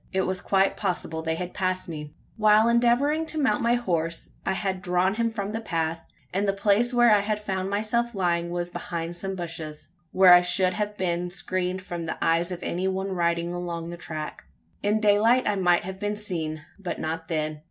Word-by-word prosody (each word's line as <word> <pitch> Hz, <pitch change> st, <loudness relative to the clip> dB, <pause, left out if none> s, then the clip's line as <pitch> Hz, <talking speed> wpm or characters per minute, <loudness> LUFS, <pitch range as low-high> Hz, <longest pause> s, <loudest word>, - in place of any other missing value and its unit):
It 190 Hz, 0 st, +1 dB
was 185 Hz, -1 st, -2 dB
quite 195 Hz, 0 st, +2 dB
possible 175 Hz, -4 st, -2 dB
they 160 Hz, 0 st, -1 dB
had 180 Hz, +1 st, -5 dB
passed 185 Hz, -1 st, -1 dB
me. 150 Hz, -3 st, -6 dB, 0.2 s
While 215 Hz, 0 st, +5 dB
endeavouring 245 Hz, +7 st, +3 dB
to 315 Hz, -, -5 dB
mount 260 Hz, -8 st, +2 dB
my 235 Hz, +1 st, +3 dB
horse, 170 Hz, -8 st, -2 dB, 0.2 s
I -, -, +2 dB
had 190 Hz, -1 st, -2 dB
drawn 180 Hz, 0 st, +1 dB
him 230 Hz, +1 st, 0 dB
from 205 Hz, -2 st, -4 dB
the 225 Hz, +1 st, -3 dB
path; 165 Hz, -5 st, -2 dB, 0.3 s
and 200 Hz, +2 st, 0 dB
the 195 Hz, -, +2 dB
place 205 Hz, +4 st, +2 dB
where 240 Hz, -2 st, +5 dB
I 210 Hz, -, +5 dB
had 210 Hz, +1 st, -1 dB
found 190 Hz, -2 st, -3 dB
myself 220 Hz, +3 st, 0 dB
lying 170 Hz, -2 st, 0 dB
was 175 Hz, 0 st, -3 dB
behind 170 Hz, 0 st, -4 dB
some 195 Hz, +2 st, -3 dB
bushes, 165 Hz, -4 st, -6 dB, 0.2 s
where 185 Hz, -1 st, +8 dB
I 175 Hz, -, +8 dB
should 185 Hz, +1 st, +2 dB
have 210 Hz, +1 st, -3 dB
been 175 Hz, -1 st, -1 dB
screened 185 Hz, 0 st, -2 dB
from 170 Hz, -3 st, -5 dB
the -, -, -3 dB
eyes 170 Hz, +2 st, +1 dB
of 175 Hz, -, -5 dB
any 180 Hz, +2 st, -1 dB
one 190 Hz, +1 st, -2 dB
riding 170 Hz, -1 st, 0 dB
along 170 Hz, -1 st, -4 dB
the -, -, -5 dB
track. 155 Hz, -3 st, -6 dB, 0.4 s
In 210 Hz, +2 st, +2 dB
daylight 215 Hz, +4 st, +4 dB
I 210 Hz, -, +2 dB
might 175 Hz, -3 st, +3 dB
have 190 Hz, +1 st, -6 dB
been 205 Hz, +1 st, -2 dB
seen; 160 Hz, -7 st, -4 dB
but 185 Hz, -3 st, -4 dB
not 165 Hz, +1 st, -3 dB
then. 155 Hz, -2 st, -2 dB
185 Hz, 205 wpm, -26 LUFS, 170-210 Hz, 0.4 s, where